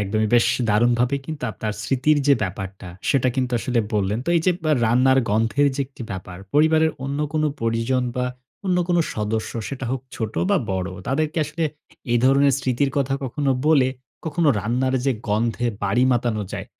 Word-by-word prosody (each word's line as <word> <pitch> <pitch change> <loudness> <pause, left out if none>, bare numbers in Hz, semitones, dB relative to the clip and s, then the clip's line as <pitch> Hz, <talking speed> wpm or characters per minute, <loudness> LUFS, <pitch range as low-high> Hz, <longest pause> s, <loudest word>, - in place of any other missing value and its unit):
একদমই 110 +2 0
বেশ 120 - +5 0.2
দারুণভাবে 120 +5 +3
কিন্তু 155 -5 -5
আপনার 110 -1 -4
স্মৃতির 140 +3 +2
যে 140 - +6
ব্যাপারটা 95 -1 -5 0.2
সেটা 130 -2 +3
কিন্তু 130 -1 0
আসলে 120 0 0
বললেন। 105 +2 0
তো - - -5
এই 165 - +3
যে 180 - +5
বা 155 - +2
রান্নার 130 +4 +4
গন্ধের 115 +7 +2
যে - - -2
একটি 130 -2 -11
ব্যাপার, 90 -1 -7 0.2
পরিবারের 160 +1 +4
অন্য 140 +1 -3
কোন 155 -1 +1 0.2
পরিজন 115 +3 0
বা 125 - 0 0.4
অন্য 180 -1 +2
কোন 175 - +2 0.2
সদস্য 110 +1 -2 0.2
সেটা 135 -1 -5
হোক 130 - -2 0.2
ছোট 110 -2 -3 0.2
বা 200 - +4
বড়, 95 0 -1 0.2
তাদেরকে 155 +4 0
আসলে 155 +3 -3 0.5
এই 120 - +4
ধরনের 140 +1 +5
স্মৃতির 135 +1 0
কথা 135 -1 +1
কখনো 140 +2 -1 0.2
বলে, 140 -5 +5 0.4
কখনো 160 0 +1
রান্নার 130 +4 0
যে 135 - +3 0.2
গন্ধে 115 +3 0 0.2
বাড়ি 110 +6 +2
মাতানো 120 -3 0
যায়, - - -5
125 Hz, 175 wpm, -22 LUFS, 110-140 Hz, 0.5 s, যে